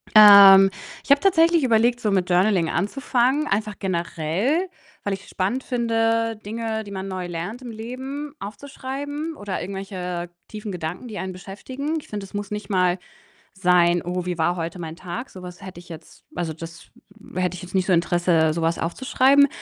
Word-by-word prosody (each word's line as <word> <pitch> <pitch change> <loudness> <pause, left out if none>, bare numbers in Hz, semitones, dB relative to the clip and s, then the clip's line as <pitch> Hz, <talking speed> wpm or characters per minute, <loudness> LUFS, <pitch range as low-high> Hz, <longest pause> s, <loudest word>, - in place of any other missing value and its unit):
Ähm, 200 -2 +10 0.3
ich - - -3
habe 285 - +7
tatsächlich 335 -4 +4
überlegt, 240 0 +3
so 210 -3 0
mit 185 -2 +1
Journaling 180 -2 +3
anzufangen, 255 - 0
einfach 210 +1 -1
generell, 190 - -1 0.3
weil 200 - -1
ich's 195 +1 -8
spannend 220 +8 -1
finde, 230 -2 0
Dinge, 220 0 -3
die 200 - -10
man 190 0 -5
neu 185 -2 -4
lernt 175 +9 -5
im 240 -2 -7
Leben, 260 +6 -6
aufzuschreiben 285 +8 -6
oder 205 -5 -4
irgendwelche 180 -2 -5 0.2
tiefen 210 -1 -7
Gedanken, 175 +6 -5
die 210 -3 -7
einen 190 0 -4
beschäftigen. 260 - -5
Ich - - -15
finde, 205 -2 -5
das 190 - -17
muss 205 0 -4
nicht 210 +1 -5
mal 180 -1 +2 0.5
sein: 175 -2 +3
„Oh, 180 0 -3
wie 180 -1 -3
war 175 +2 +1
heute 170 +1 -5
mein 160 -1 -6
Tag?“ 185 +8 -6
Sowas 180 0 -10
hätte 185 -2 -9
ich 175 - -16
jetzt 160 -1 -12
also, 170 -3 -2
das 165 +1 -10 0.5
hätte 180 -1 0
ich 180 - -8
jetzt 180 +1 -8
nicht 185 - +2
so 185 - +2
Interesse, 170 -2 +2
so 170 - -3
was 165 +1 0
aufzuschreiben. 265 +9 +3
195 Hz, 175 wpm, -23 LUFS, 180-240 Hz, 0.5 s, Ähm